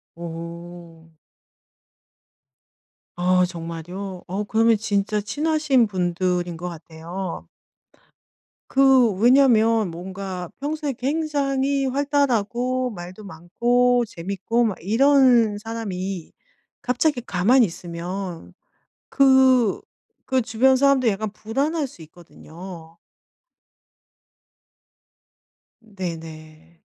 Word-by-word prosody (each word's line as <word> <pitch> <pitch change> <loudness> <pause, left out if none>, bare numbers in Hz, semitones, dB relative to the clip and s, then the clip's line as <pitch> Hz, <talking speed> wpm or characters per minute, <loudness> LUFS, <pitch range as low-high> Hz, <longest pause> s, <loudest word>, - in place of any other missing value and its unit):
어. 170 -1 -9 2.0
아 180 0 +3
정말요? 175 +2 -7
어 195 +4 -3
그러면 225 +2 +3
진짜 205 0 -1
친하신 290 +2 +1
분들인 180 -2 -1
것 180 +2 -5
같아요. 170 +2 -7 1.2
그 265 -4 +5
왜냐면 225 -3 +4
뭔가 185 0 -6
평소에 295 0 -3
굉장히 275 0 -1
활달하고 255 -2 0
말도 185 +2 -9
많고 240 +8 +1
재밌고 200 +7 -2
막 210 -5 -2
이런 240 - +4
사람이 195 -6 -5 0.5
갑자기 250 +2 0
가만히 235 +4 +3
있으면 175 0 -6 0.6
그 265 -5 +4 0.5
그 260 -1 +1
주변 245 +3 +3
사람들도 265 -4 +3
약간 210 +2 -4
불안할 280 +9 -2
수 250 - -16
있거든요. 170 +1 -12 2.8
네네. 165 -5 -9
210 Hz, 175 characters per minute, -22 LUFS, 175-255 Hz, 2.8 s, 그